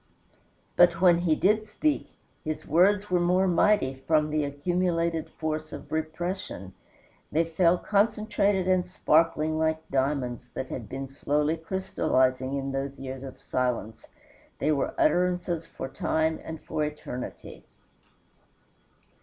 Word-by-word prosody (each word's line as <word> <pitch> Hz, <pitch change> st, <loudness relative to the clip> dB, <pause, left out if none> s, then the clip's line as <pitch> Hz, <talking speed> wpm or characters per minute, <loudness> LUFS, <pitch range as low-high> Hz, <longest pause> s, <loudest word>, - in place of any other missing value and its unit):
But 175 Hz, -1 st, +6 dB
when 175 Hz, -2 st, +5 dB
he 170 Hz, -3 st, +2 dB
did 215 Hz, +5 st, +2 dB
speak 295 Hz, +8 st, -1 dB, 0.3 s
his 155 Hz, 0 st, -4 dB
words 195 Hz, +4 st, +3 dB
were 180 Hz, -, +3 dB
more 180 Hz, +2 st, +3 dB
mighty 170 Hz, -7 st, +2 dB
from 155 Hz, -1 st, +3 dB
the 155 Hz, 0 st, +1 dB
accumulated 165 Hz, +2 st, -1 dB
force 155 Hz, -1 st, -4 dB
of -, -, -9 dB
repression. 160 Hz, -, -4 dB, 0.6 s
They 160 Hz, +2 st, +3 dB
fell 170 Hz, +1 st, +3 dB
concentrated 205 Hz, -2 st, +1 dB
and 185 Hz, -1 st, +2 dB
sparkling 160 Hz, -2 st, +2 dB
like 160 Hz, 0 st, 0 dB
diamonds 130 Hz, -3 st, -1 dB
that 130 Hz, -, -4 dB
had 115 Hz, -5 st, -6 dB
been 135 Hz, +1 st, -5 dB
slowly 145 Hz, +3 st, 0 dB
crystallizing 140 Hz, -7 st, 0 dB
in 135 Hz, 0 st, -3 dB
those 135 Hz, +1 st, -4 dB
years 130 Hz, -1 st, -6 dB
of 135 Hz, -1 st, -9 dB
silence; 125 Hz, -3 st, -2 dB, 0.5 s
they 150 Hz, -, +1 dB
were 140 Hz, -3 st, 0 dB
utterances 180 Hz, -, +1 dB
for -, -, -6 dB
time 160 Hz, +4 st, 0 dB
and 160 Hz, -1 st, -7 dB
for 155 Hz, -, -2 dB
eternity. 150 Hz, -4 st, -7 dB
160 Hz, 130 wpm, -27 LUFS, 140-180 Hz, 0.6 s, But